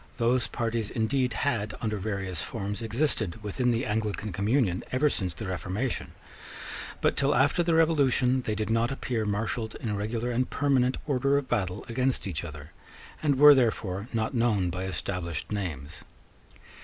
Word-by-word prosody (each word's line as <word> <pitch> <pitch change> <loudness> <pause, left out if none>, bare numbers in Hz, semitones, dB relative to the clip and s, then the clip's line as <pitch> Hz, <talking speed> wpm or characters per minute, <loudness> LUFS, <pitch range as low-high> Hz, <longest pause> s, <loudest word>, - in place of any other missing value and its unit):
Those 120 +1 +2
parties 115 -2 -2
indeed 125 +2 0
had, 110 -7 -1
under 110 -1 -1
various 95 -4 -3
forms, 105 -1 -4
existed 115 - -1
within 125 +5 0
the 120 +1 +1
Anglican 105 -1 -1
communion 100 -1 +1
ever 140 +3 +3
since 90 -5 -2
the - - -6
Reformation; 95 +6 -3 0.9
but - - +2
till 140 +1 +2
after 150 +5 +3
the 170 -1 +2
Revolution 135 -6 +3
they 110 -3 -2
did 105 +1 -2
not 115 +1 +2
appear 120 -5 -2
marshalled 110 +2 -2
in 105 -3 -3
regular 110 +4 -2
and 125 +2 0
permanent 130 -2 +2
order 140 0 +2
of 140 -2 -2
battle 100 -5 -1
against 130 +2 0
each 90 -5 -3
other, 75 -2 -9 0.5
and 145 -3 +2
were 150 +1 +10
therefore 110 -6 0
not 110 +2 -1
known 110 -7 +2
by 90 +2 -3
established 90 -2 -4
names. 75 -9 -4
115 Hz, 155 wpm, -28 LUFS, 100-130 Hz, 0.9 s, were